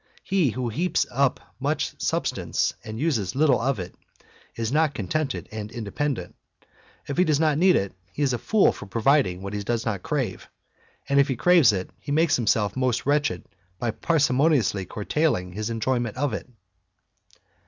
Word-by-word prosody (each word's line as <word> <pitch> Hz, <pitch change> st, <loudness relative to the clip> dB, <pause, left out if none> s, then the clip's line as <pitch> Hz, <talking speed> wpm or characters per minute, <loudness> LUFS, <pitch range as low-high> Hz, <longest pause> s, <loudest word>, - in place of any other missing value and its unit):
He 185 Hz, -7 st, +2 dB
who 125 Hz, +1 st, -3 dB
heaps 170 Hz, +11 st, 0 dB
up 135 Hz, +1 st, +1 dB, 0.2 s
much -, -, -1 dB
substance -, -, 0 dB
and 110 Hz, 0 st, -7 dB
uses. 130 Hz, -, 0 dB
little 140 Hz, -3 st, +3 dB
of 135 Hz, +1 st, 0 dB
it, 90 Hz, -2 st, -6 dB, 0.6 s
is 115 Hz, 0 st, -2 dB
not 155 Hz, -1 st, +2 dB
con 100 Hz, -, -4 dB
tented 155 Hz, -, -2 dB
and 105 Hz, 0 st, -6 dB
independent. 120 Hz, -1 st, -3 dB, 0.7 s
If 140 Hz, -, -5 dB
he -, -, +6 dB
does 155 Hz, -5 st, +2 dB
not 155 Hz, -2 st, +2 dB
need 185 Hz, +1 st, +5 dB
it, 100 Hz, 0 st, -1 dB, 0.2 s
he 145 Hz, -, -2 dB
is 135 Hz, -3 st, +2 dB
a 120 Hz, -, -1 dB
fool 220 Hz, -2 st, +3 dB
fot 100 Hz, -, -10 dB
providing 110 Hz, -6 st, +2 dB
what 100 Hz, +1 st, -5 dB
he 105 Hz, -, -2 dB
does 115 Hz, +2 st, -2 dB
not 105 Hz, -5 st, -2 dB
crave; -, -, -3 dB, 0.6 s
and 140 Hz, 0 st, +3 dB
if 140 Hz, -, +4 dB
he 130 Hz, -, -1 dB
craves 165 Hz, -3 st, +5 dB
it, 95 Hz, -2 st, -4 dB
he 145 Hz, -, -7 dB
makes 155 Hz, +1 st, +3 dB
himself 105 Hz, -4 st, +1 dB, 0.3 s
wretched 145 Hz, -, +1 dB, 0.3 s
by 120 Hz, +1 st, -1 dB
parsi 145 Hz, +3 st, +1 dB
moniously 125 Hz, -, +2 dB
curtailing 105 Hz, -, -1 dB
his 105 Hz, +3 st, -3 dB
enjoyment 120 Hz, 0 st, -1 dB
of 140 Hz, -2 st, 0 dB
it. 105 Hz, -, -5 dB
125 Hz, 175 wpm, -25 LUFS, 105-150 Hz, 0.7 s, he